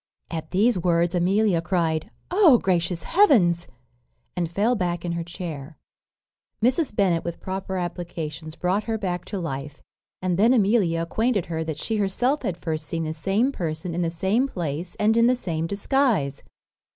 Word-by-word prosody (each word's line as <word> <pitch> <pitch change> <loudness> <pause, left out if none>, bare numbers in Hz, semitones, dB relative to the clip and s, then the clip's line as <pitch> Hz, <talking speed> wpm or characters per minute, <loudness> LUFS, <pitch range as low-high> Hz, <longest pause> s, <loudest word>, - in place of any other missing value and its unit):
At 160 -1 -4
these 205 +3 +3
words 170 0 +2
Amelia 185 0 +2
cried, 165 -3 0 0.2
"O, 355 - +6
gracious 175 -3 0
heavens!" 210 - +4 0.7
and 175 -2 -2
fell 210 +7 +2
back 175 -5 -2
in 175 - -1
her 170 0 -2
chair. 165 -4 -7 0.8
Mrs. 250 +2 +1
Bennet, 180 -5 +2
with 170 -1 -5
proper 190 0 -4
applications, 165 -3 -5
brought 190 +4 0
her 225 -1 -1
back 180 -4 -3
to 205 - -5
life; 145 -4 -5 0.4
and 185 -1 -1
then 230 +5 +5
Amelia 195 -7 +2
acquainted 220 +2 0
her 160 -1 -3
that 160 -2 -4
she 220 +7 -2
herself 245 +8 +1
had 175 - -2
first 160 -3 -4
seen 165 +1 -2
the 155 0 -3
same 195 - +1
person 165 - -4
in 175 - -1
the 170 - +1
same 190 +10 +1
place, 170 - -4
and 215 +1 +2
in 230 0 +5
the 250 - +4
same 165 -8 -3
disguise. 200 - 0
180 Hz, 165 wpm, -24 LUFS, 165-210 Hz, 0.8 s, O